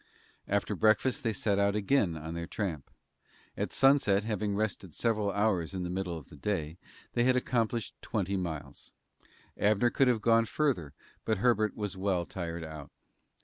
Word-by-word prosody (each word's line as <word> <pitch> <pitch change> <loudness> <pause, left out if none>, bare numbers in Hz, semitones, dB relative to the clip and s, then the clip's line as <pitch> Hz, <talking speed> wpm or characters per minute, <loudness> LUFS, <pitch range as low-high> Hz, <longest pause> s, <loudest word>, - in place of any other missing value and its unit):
After - - 0
breakfast 110 +4 +3
they 115 - 0
set 100 0 0
out 100 0 +2
again 105 -5 +2
on 80 +1 -6
their 85 0 -4
tramp. 85 -10 -4 0.7
At - - -2
sunset, 135 -8 +4
having 105 -2 -1
rested 100 -5 -3
several 110 -3 +1
hours 100 -4 0
in 90 - -2
the 90 - -3
middle 90 -2 -2
of 75 - -12
the - - -12
day, 85 -5 -2 0.3
they 120 - +2
had 130 0 +4
accomplished 120 -3 0
twenty 100 -3 -2
miles. 80 -6 -5 0.7
Abner 110 +3 +3
could 135 - +3
have 120 -3 +2
gone 115 -1 +4
further, 115 - -1 0.3
but 110 -2 0
Herbert 110 0 +2
was 105 -3 -4
well 95 -2 0
tired 85 -2 -5
out. 75 -3 -8
100 Hz, 165 wpm, -30 LUFS, 85-110 Hz, 0.7 s, sunset